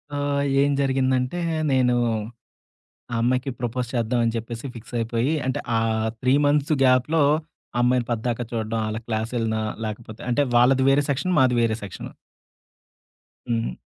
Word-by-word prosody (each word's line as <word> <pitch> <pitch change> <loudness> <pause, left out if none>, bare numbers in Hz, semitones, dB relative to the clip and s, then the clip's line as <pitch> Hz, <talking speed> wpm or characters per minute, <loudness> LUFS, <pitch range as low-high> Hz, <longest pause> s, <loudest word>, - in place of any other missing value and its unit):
ఆహ్, 145 0 0 0.2
ఏం 145 - +3
జరిగిందంటే 130 +3 +1 0.3
నేను 125 -2 +3 1.2
ఆ - - 0
అమ్మాయికి 130 +3 +1
ప్రపోజ్ 120 0 -2
చేద్దాం 120 0 0
అని 115 - 0
చెప్పేసి 115 +2 -5
ఫిక్సయిపోయి 115 +3 -2
అంటే, 130 - -1 0.2
ఆ - - +3 0.4
3 130 +1 +3
మంత్స్ 145 +1 +2
గ్యాప్‌లో 130 +5 +3 0.5
ఆ - - -1
అమ్మాయిని 125 -1 +2
పద్దాక 115 +1 -1
చూడడం, 115 -1 -2
ఆళ్ళ 110 - -3
క్లాస్ 110 0 -2
ఎళ్ళిన 110 -1 0 0.3
లేకపోతే 110 0 -7
అంటే 135 +4 +2
వాళ్ళది 130 +2 +5
వేరే 140 +1 +4
సెక్షన్. 155 +7 0
మాది 130 -2 +4
వేరే 115 -1 +1
సెక్షను. 100 -4 -7 1.4
హ్మ్. 115 0 -1
125 Hz, 140 wpm, -23 LUFS, 115-135 Hz, 1.4 s, వాళ్ళది